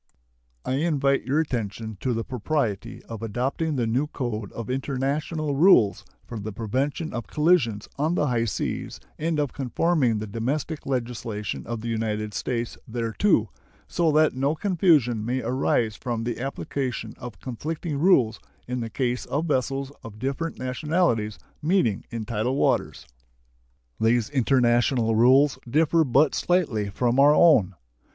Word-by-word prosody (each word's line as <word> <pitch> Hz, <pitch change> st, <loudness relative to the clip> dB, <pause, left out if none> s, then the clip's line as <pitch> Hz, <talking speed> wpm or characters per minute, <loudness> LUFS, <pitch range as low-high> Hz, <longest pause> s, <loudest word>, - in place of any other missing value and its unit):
I 130 Hz, -, 0 dB
invite 140 Hz, -3 st, +1 dB
your 140 Hz, +4 st, +1 dB
attention 110 Hz, -6 st, -3 dB
to 130 Hz, -, -1 dB
the 115 Hz, -1 st, -1 dB
propriety 120 Hz, -4 st, -2 dB
of 115 Hz, -2 st, -8 dB
adopting 130 Hz, +8 st, -1 dB
the 120 Hz, -3 st, 0 dB
new 125 Hz, +6 st, 0 dB
code 115 Hz, -8 st, -4 dB
of 115 Hz, -2 st, -6 dB
international 140 Hz, +3 st, -2 dB
rules 140 Hz, -, +5 dB, 0.2 s
for 115 Hz, -, -7 dB
the 105 Hz, +1 st, -5 dB
prevention 130 Hz, -, -2 dB
of 120 Hz, -2 st, -4 dB
collisions 150 Hz, -, +2 dB
on 155 Hz, +4 st, +1 dB
the 150 Hz, -, +1 dB
high 120 Hz, -4 st, +1 dB
seas 105 Hz, -, -3 dB, 0.2 s
and 160 Hz, 0 st, 0 dB
of 145 Hz, -3 st, -1 dB
conforming 135 Hz, -2 st, +1 dB
the 105 Hz, -, -3 dB
domestic 135 Hz, +9 st, -3 dB
legislation 120 Hz, -5 st, -3 dB
of 115 Hz, -1 st, -4 dB
the 120 Hz, -, -5 dB
United 110 Hz, -2 st, -2 dB
States 115 Hz, +3 st, -3 dB
thereto, 115 Hz, -, +1 dB, 0.4 s
so 165 Hz, -2 st, +1 dB
that 155 Hz, +1 st, +4 dB
no 135 Hz, +4 st, 0 dB
confusion 155 Hz, -, +2 dB
may 125 Hz, +3 st, -1 dB
arise 115 Hz, -2 st, +1 dB
from 120 Hz, -2 st, -3 dB
the 120 Hz, 0 st, -3 dB
application 135 Hz, -1 st, -3 dB
of 120 Hz, -5 st, -8 dB
conflicting 150 Hz, +4 st, -4 dB
rules 130 Hz, -, +4 dB, 0.3 s
in 125 Hz, 0 st, -2 dB
the 115 Hz, -1 st, -4 dB
case 125 Hz, +1 st, -1 dB
of 150 Hz, +4 st, -1 dB
vessels 135 Hz, -2 st, -1 dB
of 110 Hz, -2 st, -10 dB
different 135 Hz, +7 st, -3 dB
nationalities 130 Hz, -, 0 dB, 0.2 s
meeting 150 Hz, -, +1 dB
in 115 Hz, -2 st, -5 dB
tidal 115 Hz, +3 st, -1 dB
waters. -, -, 0 dB, 0.9 s
These 115 Hz, +2 st, +2 dB
international 120 Hz, -3 st, +2 dB
rules 130 Hz, +5 st, +5 dB
differ 160 Hz, +4 st, +3 dB
but 140 Hz, +2 st, +3 dB
slightly 140 Hz, -, 0 dB
from 120 Hz, +5 st, 0 dB
our 145 Hz, +2 st, +7 dB
own. 110 Hz, -, +5 dB
125 Hz, 145 wpm, -25 LUFS, 115-150 Hz, 0.9 s, our